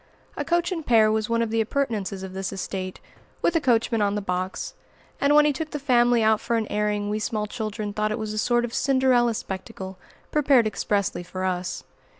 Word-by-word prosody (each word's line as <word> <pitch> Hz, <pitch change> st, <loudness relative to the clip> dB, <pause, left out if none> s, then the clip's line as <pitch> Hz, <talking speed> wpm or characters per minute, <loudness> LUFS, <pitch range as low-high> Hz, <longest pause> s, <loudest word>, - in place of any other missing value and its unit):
A -, -, -2 dB
coach 345 Hz, +1 st, +1 dB
and 335 Hz, -3 st, -3 dB
pair 220 Hz, -5 st, +5 dB
was 220 Hz, 0 st, 0 dB
one 230 Hz, 0 st, +2 dB
of 225 Hz, -, -3 dB
the 225 Hz, 0 st, +2 dB
appurtenances 215 Hz, -6 st, -2 dB
of 190 Hz, -1 st, -7 dB
this 190 Hz, -1 st, -3 dB
estate, 185 Hz, -1 st, -5 dB, 0.4 s
with 340 Hz, -, +2 dB
a 330 Hz, -, +3 dB
coachman 230 Hz, -4 st, +2 dB
on 200 Hz, 0 st, +1 dB
the -, -, 0 dB
box; 185 Hz, -1 st, -3 dB, 0.5 s
and 285 Hz, +1 st, +3 dB
when 300 Hz, 0 st, +7 dB
he 300 Hz, -, +3 dB
took 315 Hz, +2 st, -4 dB
the 300 Hz, -, -4 dB
family 245 Hz, -4 st, +3 dB
out 220 Hz, 0 st, +3 dB
for 235 Hz, -, -1 dB
an 225 Hz, -, 0 dB
airing 210 Hz, 0 st, 0 dB
we 210 Hz, -, -1 dB
small 215 Hz, -1 st, -1 dB
children 215 Hz, -2 st, -4 dB
thought 215 Hz, +1 st, 0 dB
it 215 Hz, -, -1 dB
was 215 Hz, -1 st, -4 dB
a 215 Hz, -, -2 dB
sort 240 Hz, +1 st, +2 dB
of 235 Hz, -, -8 dB
Cinderella 260 Hz, -4 st, +3 dB
spectacle, 190 Hz, -1 st, -6 dB, 0.3 s
prepared 275 Hz, -5 st, +4 dB
expressly 205 Hz, -3 st, -1 dB
for 185 Hz, +1 st, -6 dB
us. 180 Hz, -1 st, -2 dB
220 Hz, 210 wpm, -25 LUFS, 205-245 Hz, 0.5 s, when